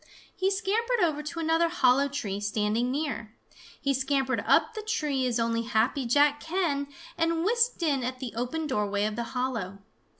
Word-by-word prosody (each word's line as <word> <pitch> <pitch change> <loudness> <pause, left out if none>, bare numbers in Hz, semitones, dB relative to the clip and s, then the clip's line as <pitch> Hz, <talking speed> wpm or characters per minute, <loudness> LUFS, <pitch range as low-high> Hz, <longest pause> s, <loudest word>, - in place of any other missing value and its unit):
He 380 +1 +1
scampered 440 +5 0
over 310 -4 +1
to 330 +3 -6
another 325 +1 +2
hollow 275 -4 +3
tree 220 -9 -3
standing 210 +3 0
near. 260 -6 -3 0.4
He 275 -1 +1
scampered 265 0 0
up 455 - +4
the 435 - -5
tree 300 - -1
as 240 -1 0
only 230 0 +1
Happy 235 +3 0
Jack 290 +3 +4
can 320 -5 -1 0.3
and 330 0 +1
whisked 470 -2 +2
in 280 -5 +1
at 255 +1 -3
the 255 -4 -6
open 250 +7 -2
doorway 205 -6 0
of 215 0 -2
the 235 +1 -3
hollow. 225 -7 -2
275 Hz, 170 wpm, -28 LUFS, 235-330 Hz, 0.4 s, up